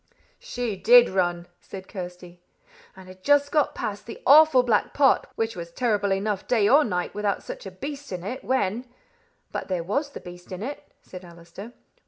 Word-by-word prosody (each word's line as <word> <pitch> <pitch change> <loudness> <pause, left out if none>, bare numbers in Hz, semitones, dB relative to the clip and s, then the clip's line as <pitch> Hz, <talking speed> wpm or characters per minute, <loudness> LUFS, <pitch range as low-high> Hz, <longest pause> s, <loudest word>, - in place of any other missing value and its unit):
"She 245 - -4
did 240 +5 +6
run," 175 -2 -1
said 190 -1 -10
Kirsty, 180 -2 -9 0.5
"and 190 -1 -14
had 185 0 -14
just 285 0 +3
got 300 -2 +1
past 205 +1 -5
the 230 - -8
awful 295 -2 +7
black 225 -4 0
pot, 275 -2 +3
which 225 0 -2
was 170 -1 -7
terrible 205 -2 0
enough 195 +1 -2
day 220 -5 +2
or 285 +7 +6
night 180 -7 -3
without 205 -1 -2
such - - -8
a - - -5
beast 280 +7 -8
in 180 -2 -5
it, 250 +8 -6
when 245 -1 -1 0.3
" 470 0 -41
"But - - -5
there 180 -3 -2
was 280 - -2
the - - -7
beast 175 +1 -13
in 185 +2 -6
it," 280 +4 -7
said 185 0 -11
Allister. 170 +6 -12
205 Hz, 190 wpm, -25 LUFS, 185-255 Hz, 0.5 s, awful